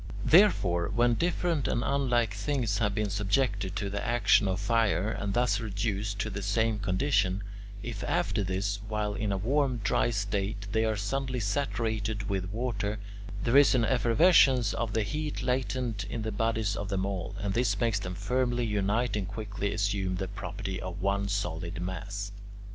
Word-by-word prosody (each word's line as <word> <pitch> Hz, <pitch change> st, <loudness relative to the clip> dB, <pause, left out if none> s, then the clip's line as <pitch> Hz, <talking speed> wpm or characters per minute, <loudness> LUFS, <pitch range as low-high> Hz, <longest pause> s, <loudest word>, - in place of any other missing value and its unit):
4. -, -, -2 dB
Therefore, 100 Hz, -, +5 dB
when 120 Hz, 0 st, +4 dB
different 170 Hz, +1 st, 0 dB
and 120 Hz, -, 0 dB
unlike 120 Hz, -6 st, +1 dB
things 110 Hz, 0 st, -1 dB
have 105 Hz, -3 st, +1 dB
been 105 Hz, -2 st, -1 dB
subjected 100 Hz, -1 st, 0 dB
to 100 Hz, -, -2 dB
the 100 Hz, +1 st, -3 dB
action 115 Hz, -3 st, +3 dB
of 95 Hz, 0 st, -1 dB
fire 110 Hz, -1 st, +1 dB
and 100 Hz, -2 st, -3 dB
thus 120 Hz, -3 st, +2 dB
reduced 105 Hz, -2 st, -2 dB
to 110 Hz, +1 st, -2 dB
the 100 Hz, -, -4 dB
same 110 Hz, +2 st, +1 dB
condition, 100 Hz, -1 st, +1 dB, 0.4 s
if 115 Hz, -4 st, -5 dB
after 105 Hz, -, 0 dB
this, 100 Hz, +2 st, -1 dB
while 105 Hz, -1 st, -1 dB
in 105 Hz, -1 st, -2 dB
a 100 Hz, -, 0 dB
warm, 130 Hz, +5 st, +1 dB
dry 100 Hz, -, +2 dB
state, 100 Hz, -1 st, -2 dB
they 110 Hz, +1 st, +2 dB
are 110 Hz, -1 st, +1 dB
suddenly 130 Hz, +5 st, -2 dB
saturated 110 Hz, -2 st, -1 dB
with 95 Hz, -2 st, -2 dB
water, 110 Hz, -2 st, -2 dB, 0.5 s
there 120 Hz, +2 st, +1 dB
is 140 Hz, -1 st, +6 dB
an 120 Hz, -3 st, +3 dB
effervescence 125 Hz, -, +4 dB
of 115 Hz, -2 st, -2 dB
the 110 Hz, -, +1 dB
heat 150 Hz, +8 st, -3 dB
latent 125 Hz, -4 st, -1 dB
in 115 Hz, -, -4 dB
the 110 Hz, -, -2 dB
bodies 110 Hz, -1 st, 0 dB
of 100 Hz, -2 st, -4 dB
them 95 Hz, -2 st, 0 dB
all, 100 Hz, 0 st, -4 dB
and 100 Hz, 0 st, -2 dB
this 105 Hz, -3 st, +1 dB
makes 115 Hz, -4 st, +1 dB
them 90 Hz, -2 st, -5 dB
firmly 120 Hz, +4 st, 0 dB
unite 105 Hz, +2 st, 0 dB
and 100 Hz, -3 st, -2 dB
quickly 100 Hz, 0 st, -4 dB
assume 100 Hz, -2 st, 0 dB
the 95 Hz, +1 st, -3 dB
property 95 Hz, 0 st, -5 dB
of 90 Hz, 0 st, -6 dB
one 100 Hz, +1 st, 0 dB
solid 85 Hz, -2 st, -3 dB
mass. 95 Hz, +3 st, -4 dB
105 Hz, 175 wpm, -29 LUFS, 100-120 Hz, 0.5 s, is